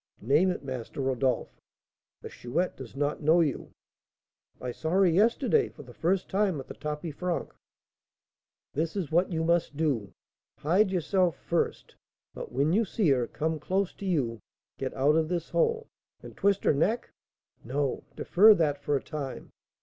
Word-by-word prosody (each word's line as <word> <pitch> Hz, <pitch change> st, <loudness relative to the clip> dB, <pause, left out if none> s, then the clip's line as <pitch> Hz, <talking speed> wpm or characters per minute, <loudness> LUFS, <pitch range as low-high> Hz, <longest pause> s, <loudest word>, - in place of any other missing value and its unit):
"Name 150 Hz, -, +4 dB
it, 180 Hz, -, -3 dB
Master 130 Hz, -1 st, -6 dB
Rodolph." 130 Hz, -2 st, -1 dB, 0.6 s
"The -, -, -6 dB
Chouette 150 Hz, +10 st, -2 dB
does 130 Hz, -2 st, -10 dB
not 145 Hz, +2 st, -1 dB
know 160 Hz, +3 st, +4 dB
you?" 150 Hz, -5 st, -1 dB, 0.9 s
"I 125 Hz, -, -4 dB
saw 160 Hz, +6 st, -4 dB
her 190 Hz, +3 st, +4 dB
yesterday 230 Hz, -, +3 dB
for -, -, -13 dB
the -, -, -13 dB
first 180 Hz, +3 st, 0 dB
time 195 Hz, -5 st, +1 dB
at 135 Hz, -, -8 dB
the -, -, -7 dB
tapis 150 Hz, +1 st, -5 dB
franc." 180 Hz, +3 st, -3 dB, 1.2 s
"This 160 Hz, +4 st, -2 dB
is 180 Hz, -7 st, -3 dB
what 175 Hz, +4 st, +2 dB
you 160 Hz, -1 st, -1 dB
must 170 Hz, -3 st, +1 dB
do. 135 Hz, -11 st, 0 dB, 0.5 s
Hide 185 Hz, +7 st, +2 dB
yourself 180 Hz, -1 st, +1 dB
first; 170 Hz, -, -2 dB, 0.4 s
but, -, -, -7 dB
when 140 Hz, +6 st, +1 dB
you 220 Hz, +4 st, +4 dB
see 200 Hz, -3 st, 0 dB
her 125 Hz, -4 st, +2 dB
come 160 Hz, +4 st, -2 dB
close 190 Hz, +5 st, -1 dB
to 200 Hz, -, -7 dB
you, 125 Hz, -11 st, 0 dB, 0.4 s
get 130 Hz, -, -2 dB
out 140 Hz, +3 st, +3 dB
of 160 Hz, -1 st, +1 dB
this 175 Hz, -2 st, -3 dB
hole 460 Hz, -1 st, +1 dB, 0.2 s
" -, -, -45 dB
"And -, -, -10 dB
twist 200 Hz, -1 st, +1 dB
her -, -, +4 dB
neck?" 210 Hz, +12 st, 0 dB, 0.5 s
"No, 135 Hz, +2 st, -2 dB
defer 210 Hz, +4 st, +6 dB
that 150 Hz, -5 st, +1 dB
for 145 Hz, 0 st, 0 dB
a 135 Hz, -, -1 dB
time. 145 Hz, -4 st, -6 dB
160 Hz, 170 wpm, -28 LUFS, 140-185 Hz, 1.2 s, defer